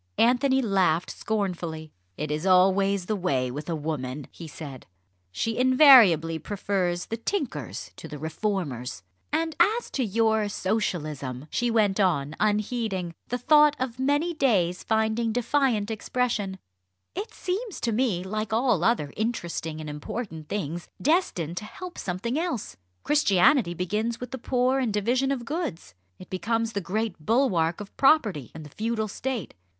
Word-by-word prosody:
Anthony 260 +2 +3
laughed 185 -6 +2
scornfully. 175 -7 -3 0.3
"It 150 0 -3
is 150 +1 -2
always 190 +1 +4
the 215 - -1
way 135 -10 0
with 150 +5 -6
a 165 - 0
woman," 145 -3 -4
he 165 - -9
said; 145 -4 -9 0.4
"she 225 - -2
invariably 245 - +7
prefers 185 -3 -1
the 225 - -4
tinkers 230 - -4
to - - -8
the 150 - -7
reformers." 155 - -3 0.3
"And 320 +1 0
as 435 +7 +2
to 265 - 0
your 220 0 +1
Socialism," 155 - -2
she 240 - 0
went 215 -3 +2
on, 155 -7 +1
unheeding, 210 -4 0
the 245 - -2
thought 300 +3 +5
of 255 -1 -4
many 290 +6 +1
days 190 - +1
finding 220 +1 +1
defiant 240 -3 +1
expression 220 -3 -1 0.6
"it 405 +5 -5
seems 390 +3 -4
to 235 - 0
me 215 -6 0
like 215 +2 -3
all 240 +3 +2
other 220 -12 +1
interesting 170 -8 -3
and 155 - -6
important 155 +2 -6
things 175 -4 -3
destined 185 - 0
to 210 - -4
help 360 - -9
something 215 - -2
else! 255 - -3 0.3
Christianity 205 - +3
begins 210 +6 -2
with 250 -1 -7
the 260 - -5
poor 255 +2 +1
and 245 -4 0
division 245 +6 +1
of 250 -4 -2
goods 300 - -4 0.2
it 185 - -13
becomes 225 +4 -1
the 200 - -1
great 200 -2 -3
bulwark 180 - +2
of 205 -1 -9
property 220 - +3
and 160 -1 -8
the - - -10
feudal 220 +2 -2
state. 240 - -4
210 Hz, 150 wpm, -26 LUFS, 170-245 Hz, 0.6 s, invariably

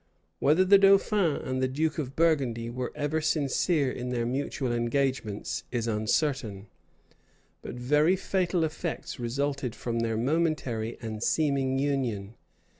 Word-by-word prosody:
Whether 160 +6 +4
the 195 +1 +7
dauphin 195 -4 +4
and 130 0 -3
the 130 - +2
duke 155 +4 -1
of 135 -2 -4
Burgundy 130 -8 +1
were 125 +1 -4
ever 150 +2 -1
sincere 150 -1 +1
in 125 0 -5
their 120 -2 -1
mutual 130 0 -2
engagements, 120 -3 -1
is 120 -2 -1
uncertain; 110 -1 -1 1.0
but - - -7
very 150 +8 +3
fatal 185 -2 0
effects 160 -2 -4
resulted 135 +1 -2
from 115 -1 -3
their 115 -1 -1
momentary 135 -5 -1
and 110 -1 -5
seeming 135 -2 +1
union. 125 -8 -1
135 Hz, 130 wpm, -28 LUFS, 120-155 Hz, 1.0 s, the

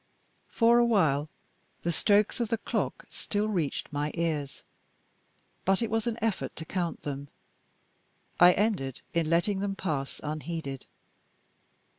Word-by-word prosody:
For 235 +1 +4
a - - +6
while, 160 -11 +2 0.5
the 170 - +1
strokes 205 +6 +3
of 235 - +1
the 230 +1 0
clock - - -2
still 210 0 -1
reached 170 -7 -2
my 145 +1 0
ears. 155 -5 -2 1.0
But 195 +4 +2
it 225 - -2
was 225 0 0
an 235 -1 -1
effort 225 -3 -1
to 160 - -6
count 175 -2 -3
them; 140 -1 -4 1.1
I 175 +1 +9
ended 190 - 0
in 165 -2 +1
letting 175 +4 +2
them 195 0 -1
pass 145 -8 -3
unheeded. 150 -2 -4
175 Hz, 135 wpm, -29 LUFS, 150-210 Hz, 1.1 s, I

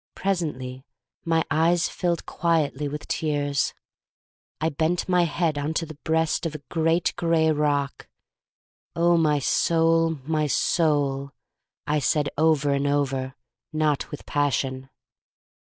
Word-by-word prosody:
Presently 140 -9 -3 0.4
my 165 -1 +2
eyes 165 +2 +3
filled 175 -2 -2
quietly 155 -4 0
with 150 +1 -6
tears. 145 -2 -1 0.8
I 160 - +1
bent 160 +3 -1
my 180 -1 +3
head 160 -2 0
into 160 +3 -1
the 155 - -9
breast 160 +1 +1
of 155 - -7
a 145 - -8
great 165 +1 +1
gray 165 -2 +2
rock. 145 -2 -1 0.9
Oh, 170 +1 +4
my 155 -3 +3
soul, 165 +3 +2
my 155 -1 0
soul, 140 -3 +1 0.5
I 150 0 +1
said 145 +2 +1
over 150 -2 +2
and 140 0 +1
over, 135 -2 -1 0.4
not 155 -2 0
with 150 - -8
passion. 135 -2 -1
155 Hz, 120 wpm, -25 LUFS, 145-165 Hz, 0.9 s, Oh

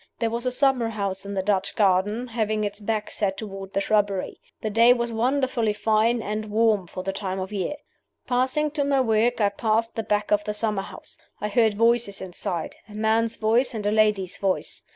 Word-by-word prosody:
There 230 -1 -1
was 235 +2 -2
a - - +1
summer 255 -3 +2
house 200 -3 -3
in 200 - -5
the 190 - -1
Dutch 195 -1 0
Garden, 205 +4 +2
having 215 -2 -1
its 205 0 -3
back 215 0 -2
set 195 -2 -1
toward 195 -2 -7
the - - +1
shrubbery. 200 -2 0 0.2
The 215 - -2
day 230 +3 +6
was 235 -1 -2
wonderfully 240 -1 +1
fine 220 +2 +1
and 215 +2 -3
warm 215 -3 +2
for 185 - -7
the 195 - -2
time 190 -1 -3
of 190 +2 -5
year. 200 +9 -2 0.5
"Passing 260 +5 +1
to 295 -1 0
my 280 -1 +2
work, 235 0 +2
I 205 -2 +3
passed 220 +2 0
the 225 - -1
back 210 -1 -1
of 210 0 +3
the 210 -1 -2
summer 210 -2 0
house. - - -10 0.2
I 210 - -2
heard 220 0 +3
voices 230 -2 +2
inside 175 -2 -4
a 210 - -11
man's 220 +1 +1
voice 230 +3 +2
and 210 -2 -4
a 205 - +2
lady's 210 -4 +2
voice. 195 -2 -1
215 Hz, 205 wpm, -24 LUFS, 200-230 Hz, 0.5 s, day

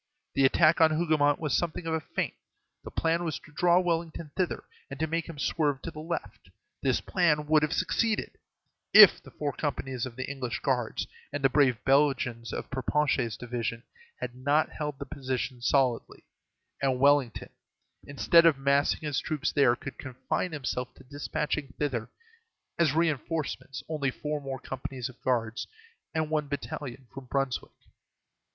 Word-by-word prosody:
The 135 - +4
attack 160 +4 +4
on 160 - +7
Hougomont 155 -3 +2
was 150 -5 0
something 175 0 -1
of 165 - -1
a 160 - +1
feint; - - -3 0.5
the - - -7
plan 165 +1 0
was 160 -2 -2
to 155 - -16
draw 175 +3 +4
Wellington 165 -3 -2
thither, 185 -2 -1 0.3
and - - -8
to 160 - +2
make 165 +1 -2
him 165 - -8
swerve 145 -1 0
to 165 - -5
the 155 - -9
left. 165 +2 -5 0.3
This - - +2
plan 155 -5 +2
would 155 0 +4
have 150 - 0
succeeded 215 +4 0 0.6
if 210 -4 +10
the - - -14
four 145 -1 -3
companies 135 -4 -3
of 120 - -11
the 130 - -4
English 135 -4 -3
guards 125 -5 -1 0.3
and 145 0 -4
the 135 - +4
brave 135 -5 +4
Belgians 135 -4 +2
of - - -5
Perponcher's 130 -3 0
division 120 -1 -4 0.4
had 120 - -4
not 140 +5 +1
held 150 -2 -4
the 140 - -6
position 130 -2 -4
solidly, 130 -2 +1 0.6
and 130 -2 +1
Wellington, 140 -4 +3 0.6
instead 165 +4 +5
of 155 -4 +4
massing 140 +1 +2
his 150 -5 -1
troops 155 0 -2
there, 135 -4 +4
could 135 +1 -9
confine 130 +7 -3
himself 130 -4 -3
to - - -16
despatching 145 +1 -3
thither, 125 -6 -2 0.7
as 155 -4 +3
reinforcements, 155 -4 -1
only 150 -4 -1
four 150 +3 -4
more 135 -1 -5
companies 130 -1 -5
of 130 - -16
guards 115 -2 -1 0.5
and 155 -1 0
one 150 -2 0
battalion 145 -2 -5
from 135 -1 -8
Brunswick. 135 0 -2
145 Hz, 160 wpm, -28 LUFS, 130-155 Hz, 0.7 s, if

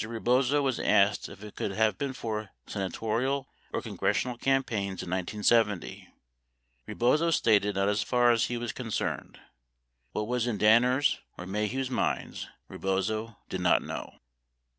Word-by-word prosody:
Rebozo 125 +5 +1
was 130 -3 0
asked 100 +1 +3
if 100 +1 -12
it 105 - -10
could 100 - -3
have 110 -1 +1
been 140 -2 -2
for 110 -4 -4 0.2
senatorial 115 +7 -2 0.2
or - - -3
congressional 125 -1 -1
cam 135 +2 +2
paigns 100 -6 -3
in 90 - -7
1970. 105 +2 +1 0.8
Rebozo 150 +8 +2
stated 105 -9 +3
not 100 0 +1
as 105 0 +1
far 120 -1 +3
as 115 -1 +3
he 120 - -3
was 120 -1 -3
concerned. 115 -4 -4 0.7
What 105 - -1
was 125 0 0
in 115 -4 -1
Danner's 125 +6 +4 0.2
or 90 - -7
Maheu's 105 +7 -2
minds, - - -2 0.2
Rebozo 105 +4 -2
did 95 - -4
not 90 - +3
know. - - -6
110 Hz, 145 wpm, -29 LUFS, 105-125 Hz, 0.8 s, Danner's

